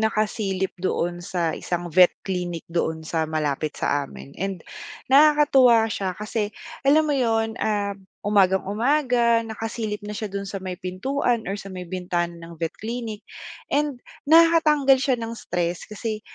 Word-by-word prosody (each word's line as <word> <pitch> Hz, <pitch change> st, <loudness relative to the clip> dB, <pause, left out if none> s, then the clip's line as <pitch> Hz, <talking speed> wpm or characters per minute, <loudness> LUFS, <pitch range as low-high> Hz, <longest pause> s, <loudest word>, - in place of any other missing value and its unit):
nakasilip 210 Hz, -3 st, 0 dB
doon 175 Hz, -1 st, -1 dB
sa 175 Hz, -3 st, -1 dB
isang 175 Hz, +1 st, -4 dB
vet 180 Hz, +2 st, +8 dB, 0.2 s
clinic 180 Hz, -3 st, -3 dB
doon 160 Hz, -2 st, -1 dB
sa 160 Hz, 0 st, -1 dB
malapit 155 Hz, -1 st, -2 dB
sa 145 Hz, -1 st, 0 dB
amin 140 Hz, -, -11 dB
and, 195 Hz, -3 st, -3 dB, 0.5 s
nakakatuwa 275 Hz, -5 st, +6 dB
siya 190 Hz, -3 st, -3 dB
kasi, 210 Hz, 0 st, -2 dB, 0.4 s
alam 305 Hz, +3 st, +5 dB
mo 300 Hz, -, 0 dB
'yon, 225 Hz, -4 st, +1 dB
ah, 205 Hz, -2 st, 0 dB, 0.3 s
umagang-umaga 230 Hz, +5 st, +2 dB
nakasilip 220 Hz, -1 st, -4 dB
na 210 Hz, -, -5 dB
siya 210 Hz, 0 st, -4 dB
do'n 200 Hz, 0 st, -4 dB
sa 195 Hz, 0 st, -5 dB
may 185 Hz, -1 st, -5 dB
pintuan 230 Hz, +7 st, -1 dB
or 195 Hz, -, -2 dB
sa 195 Hz, -1 st, -9 dB
may 180 Hz, -2 st, -7 dB
bintana 175 Hz, -1 st, -2 dB
ng 170 Hz, 0 st, -11 dB
vet 165 Hz, 0 st, -1 dB
clinic 225 Hz, -2 st, -5 dB, 0.5 s
and 290 Hz, -2 st, +1 dB, 0.3 s
nakakatanggal 310 Hz, -4 st, +6 dB
siya 265 Hz, -1 st, +2 dB
ng 230 Hz, -1 st, -5 dB
stress. 175 Hz, -6 st, -3 dB
Kasi 215 Hz, 0 st, -4 dB
205 Hz, 145 wpm, -24 LUFS, 180-235 Hz, 0.5 s, vet